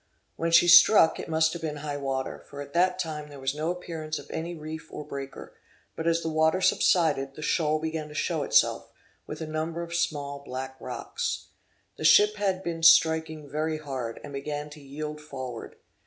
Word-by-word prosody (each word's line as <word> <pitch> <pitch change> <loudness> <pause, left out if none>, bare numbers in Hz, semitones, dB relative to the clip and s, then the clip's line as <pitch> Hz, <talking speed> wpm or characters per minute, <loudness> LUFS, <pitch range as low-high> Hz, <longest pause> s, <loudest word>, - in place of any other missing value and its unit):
When 165 - -1
she 165 +1 +6
struck 175 0 +7
it - - -6
must 160 0 +2
have 170 - -6
been 155 -2 -3
high 145 -1 -3
water, 135 -1 -3
for 140 - -9
at 140 0 -8
that 180 +1 +3
time 155 -4 -4
there 145 -1 -11
was 135 0 -1
no 155 +2 -2
appearance 160 -3 -4
of - - -10
any 170 +2 -4
reef 160 +1 -8
or 150 - -7
breaker; 135 -1 -8 0.4
but 160 - -3
as 165 0 +2
the - - -2
water 160 +3 +2
subsided, 155 -7 +2
the 155 - -8
shoal 155 -2 +1
began 160 0 -4
to 150 - -12
show - - -1
itself, - - +2 0.4
with - - -7
a - - -2
number 160 +2 -3
of 170 0 -8
small 145 -4 -2
black 130 0 -6
rocks. 125 - -4 0.5
The - - -7
ship 210 +6 +6
had 190 -2 -1
been 165 -1 -4
striking 160 -2 +4
very 155 +2 -2
hard, 130 -6 -5
and 145 - -9
began 145 +1 -5
to 150 0 -12
yield 150 +2 -6
forward. 130 -6 -7
155 Hz, 195 wpm, -27 LUFS, 145-165 Hz, 0.5 s, struck